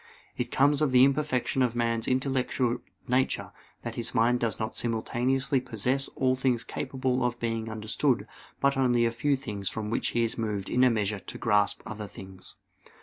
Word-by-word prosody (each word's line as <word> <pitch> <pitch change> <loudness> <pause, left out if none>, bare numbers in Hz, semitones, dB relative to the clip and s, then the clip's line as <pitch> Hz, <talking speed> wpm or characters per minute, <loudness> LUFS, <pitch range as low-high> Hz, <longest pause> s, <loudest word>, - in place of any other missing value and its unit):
It - - -2
comes 145 +2 +3
of 150 -3 +2
the 125 0 +7
imperfection 135 -2 +1
of 120 -2 +2
man's 115 -1 0
intellectual 130 -2 0 0.3
nature 130 +2 +1 0.3
that - - -4
his - - -4
mind 120 +2 +3
does 115 -2 -1
not 110 0 -2
simultaneously 125 +4 0
possess 125 +3 0
all 130 -1 +2
things 125 -2 +1
capable 130 0 -2
of 120 -1 -1
being 115 -1 -2
understood, 110 +1 0 0.3
but 140 0 +3
only 120 -3 +3
a 115 - +2
few 140 +5 +1
things 105 -7 -4
from 105 0 -4
which 115 - 0
he 120 - +1
is 115 0 -2
moved 105 -3 -2
in 125 - +4
a 130 - +7
measure 105 -3 0
to - - -8
grasp 105 -2 +1
other 105 -1 -6
things. 95 -1 -9
120 Hz, 180 wpm, -28 LUFS, 110-130 Hz, 0.3 s, the